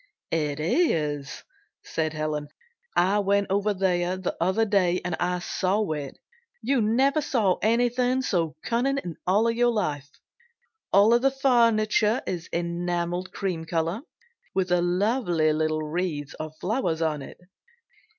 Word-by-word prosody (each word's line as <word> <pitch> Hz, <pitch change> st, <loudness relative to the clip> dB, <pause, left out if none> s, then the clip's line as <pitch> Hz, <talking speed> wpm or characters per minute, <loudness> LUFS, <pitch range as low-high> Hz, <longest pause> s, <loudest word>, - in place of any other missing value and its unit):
"It 150 Hz, -3 st, -1 dB
is," 150 Hz, -, 0 dB, 0.4 s
said 155 Hz, -1 st, -2 dB
Helen. 155 Hz, -1 st, -3 dB, 0.5 s
"I 195 Hz, +4 st, +3 dB
went 200 Hz, 0 st, +2 dB
over 200 Hz, +2 st, +1 dB
there 185 Hz, -2 st, 0 dB
the 185 Hz, -, -3 dB
other 190 Hz, +6 st, +2 dB
day 185 Hz, -4 st, +2 dB
and 180 Hz, -2 st, -1 dB, 0.3 s
saw 195 Hz, +1 st, 0 dB
it. 145 Hz, -3 st, -5 dB, 0.5 s
You 260 Hz, +1 st, +2 dB
never 265 Hz, +8 st, +2 dB
saw 210 Hz, -11 st, +1 dB
anything 245 Hz, +3 st, +2 dB
so 165 Hz, -9 st, 0 dB
cunning 260 Hz, +4 st, 0 dB
in 175 Hz, -, -5 dB, 0.4 s
your 240 Hz, +1 st, +3 dB
life. 145 Hz, -, -2 dB, 0.8 s
All 215 Hz, +5 st, +5 dB
the 270 Hz, +2 st, +3 dB
furniture 230 Hz, -4 st, +2 dB
is 170 Hz, -2 st, -4 dB
enameled 175 Hz, +1 st, -2 dB
cream 180 Hz, -5 st, -3 dB
color, 165 Hz, +5 st, -1 dB, 0.5 s
with 185 Hz, -2 st, 0 dB
lovely 175 Hz, -2 st, +2 dB
little 155 Hz, 0 st, 0 dB
wreaths 155 Hz, -3 st, -3 dB
of 155 Hz, 0 st, -7 dB
flowers 185 Hz, -6 st, -1 dB
on 155 Hz, -2 st, -1 dB
it. -, -, -11 dB
185 Hz, 125 wpm, -26 LUFS, 160-225 Hz, 0.8 s, All